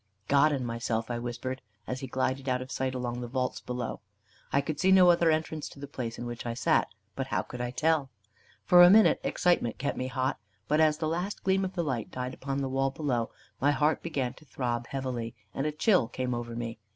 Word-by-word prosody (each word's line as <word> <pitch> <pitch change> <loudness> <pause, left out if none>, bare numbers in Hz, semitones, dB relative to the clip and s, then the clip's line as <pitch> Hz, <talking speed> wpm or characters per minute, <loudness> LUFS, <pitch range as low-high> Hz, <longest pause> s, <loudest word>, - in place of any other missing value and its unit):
"God 145 +2 +5
and 135 -4 -1
myself," 115 0 -2
I 120 - -2
whispered, 120 +2 -4 0.2
as 125 - -4
he 135 - -5
glided 130 +1 -1
out 125 0 +1
of 130 +1 -7
sight 130 0 -2
along 125 -1 -3
the 120 - -4
vaults 125 +1 -2
below. 125 -2 -4 0.5
I 140 - +3
could 145 +1 -3
see 190 +1 +4
no 185 -2 +8
other 170 -1 +3
entrance 155 -1 -1
to - - -14
the 140 - -5
place 125 -5 -5
in 120 - -5
which 120 -1 -5
I 120 -1 -3
sat; 120 - +2 0.3
but 135 -1 -3
how - - 0
could 125 - -7
I 125 - -2
tell? 150 +2 +1 0.6
For 175 0 +8
a 175 - +10
minute 215 +3 +6
excitement 175 -10 +1
kept 140 +1 -2
me 130 - -1
hot; 130 +1 -1 0.3
but 150 +2 +3
as 155 -1 +4
the 155 - -1
last 175 +5 -3
gleam 190 0 +2
of 190 0 -3
the 170 - 0
light 130 -8 -2
died 125 0 -4
upon 135 +1 -3
the 135 - -1
wall 135 +1 +1
below, 130 -5 -1 0.3
my 140 - +4
heart 150 +2 +2
began 135 -7 -2
to 155 - -18
throb 120 -3 -3
heavily, 125 -4 -4 0.2
and 135 - -1
a - - 0
chill 175 - +3
came 125 +1 -3
over 120 -1 -4
me. 115 -1 -5
130 Hz, 230 wpm, -29 LUFS, 120-155 Hz, 0.6 s, a